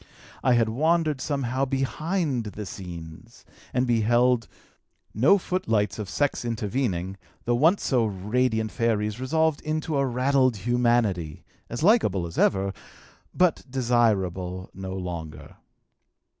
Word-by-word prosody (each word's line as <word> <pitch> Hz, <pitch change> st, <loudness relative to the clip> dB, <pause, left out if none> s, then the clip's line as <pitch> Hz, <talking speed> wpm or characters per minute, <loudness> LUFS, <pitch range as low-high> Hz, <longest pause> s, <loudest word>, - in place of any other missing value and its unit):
I 130 Hz, -, +4 dB
had 115 Hz, -1 st, +3 dB
wandered 155 Hz, +4 st, +1 dB
somehow 135 Hz, -2 st, -1 dB
behind 135 Hz, -, -1 dB
the 105 Hz, 0 st, -6 dB
scenes, 90 Hz, +2 st, -10 dB, 0.3 s
and 125 Hz, +1 st, +1 dB
beheld, 120 Hz, +1 st, +2 dB, 0.7 s
no 140 Hz, -, +5 dB
footlights 175 Hz, -, -1 dB
of 105 Hz, -3 st, -5 dB
sex 145 Hz, -3 st, 0 dB
intervening, 105 Hz, -5 st, -2 dB, 0.3 s
the 120 Hz, -, +2 dB
once 160 Hz, +11 st, +3 dB
so 125 Hz, -4 st, +2 dB
radiant 110 Hz, +3 st, 0 dB
fairies 105 Hz, -1 st, 0 dB
resolved 160 Hz, +3 st, +1 dB
into 155 Hz, 0 st, -2 dB
a 140 Hz, -, +2 dB
raddled 130 Hz, -1 st, +2 dB
humanity, 115 Hz, -7 st, 0 dB, 0.3 s
as 120 Hz, +5 st, -4 dB
likable 165 Hz, -, +3 dB
as 85 Hz, -, -5 dB
ever, 95 Hz, 0 st, +2 dB, 0.6 s
but 180 Hz, -3 st, +2 dB
desirable 95 Hz, -8 st, 0 dB
no 95 Hz, 0 st, -6 dB
longer. 85 Hz, -4 st, -7 dB
120 Hz, 115 wpm, -25 LUFS, 100-135 Hz, 0.7 s, no